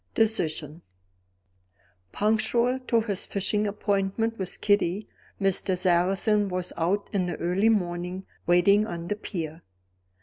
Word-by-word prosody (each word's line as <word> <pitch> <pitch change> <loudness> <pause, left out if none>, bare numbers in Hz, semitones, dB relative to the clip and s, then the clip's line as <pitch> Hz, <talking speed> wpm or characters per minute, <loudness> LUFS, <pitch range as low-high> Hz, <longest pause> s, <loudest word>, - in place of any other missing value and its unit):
Decision. 165 -8 0 1.3
Punctual 235 +4 +1
to 230 -1 +3
his 205 -4 -2
fishing 205 +1 0
appointment 205 +2 -1
with 190 - -3
Kitty, 205 -1 +1 0.3
Mr. 195 -1 +2
Sarrazin 190 +4 +2
was 180 -1 -3
out 185 +5 0
in 185 -3 +1
the 175 - -3
early 185 +6 +1
morning, 180 -2 -1 0.2
waiting 200 +5 +4
on 170 -3 -6
the 210 - 0
pier. 165 -6 -6
195 Hz, 115 wpm, -26 LUFS, 175-210 Hz, 1.3 s, waiting